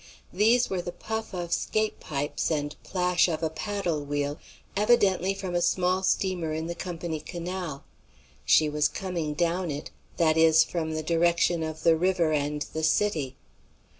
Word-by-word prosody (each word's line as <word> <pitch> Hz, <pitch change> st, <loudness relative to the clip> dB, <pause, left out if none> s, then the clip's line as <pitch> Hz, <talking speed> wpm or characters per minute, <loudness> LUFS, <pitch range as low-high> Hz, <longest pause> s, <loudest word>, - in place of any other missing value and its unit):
These 230 Hz, +6 st, +4 dB
were 185 Hz, -2 st, -2 dB
the 175 Hz, -, -5 dB
puff 220 Hz, +5 st, -5 dB
of 175 Hz, -2 st, -3 dB
'scape 215 Hz, 0 st, 0 dB
pipes 145 Hz, 0 st, -2 dB
and 145 Hz, -2 st, -2 dB
plash 180 Hz, -1 st, +2 dB
of 165 Hz, -2 st, -2 dB
a 160 Hz, -, 0 dB
paddle 175 Hz, -3 st, -2 dB
wheel, 145 Hz, +1 st, -2 dB, 0.4 s
evidently 195 Hz, -3 st, +3 dB
from 190 Hz, -2 st, -5 dB
a 175 Hz, -, +1 dB
small 180 Hz, +1 st, +2 dB
steamer 185 Hz, -4 st, 0 dB
in 160 Hz, +1 st, -3 dB
the 170 Hz, -, -3 dB
Company 170 Hz, -2 st, -4 dB
Canal. 175 Hz, -3 st, -5 dB, 0.6 s
She 155 Hz, -, +5 dB
was 150 Hz, 0 st, +2 dB
coming 170 Hz, -6 st, -3 dB
down 175 Hz, +2 st, 0 dB
it; 145 Hz, 0 st, -5 dB, 0.3 s
that 160 Hz, -1 st, +3 dB
is, 160 Hz, 0 st, +6 dB
from 160 Hz, -2 st, -3 dB
the 155 Hz, 0 st, -3 dB
direction 170 Hz, +1 st, +2 dB
of 160 Hz, 0 st, -5 dB
the 165 Hz, -1 st, +5 dB
river 175 Hz, -1 st, +2 dB
and 150 Hz, 0 st, 0 dB
the 160 Hz, -, -2 dB
city. 160 Hz, -5 st, +1 dB
170 Hz, 165 wpm, -27 LUFS, 155-185 Hz, 0.6 s, is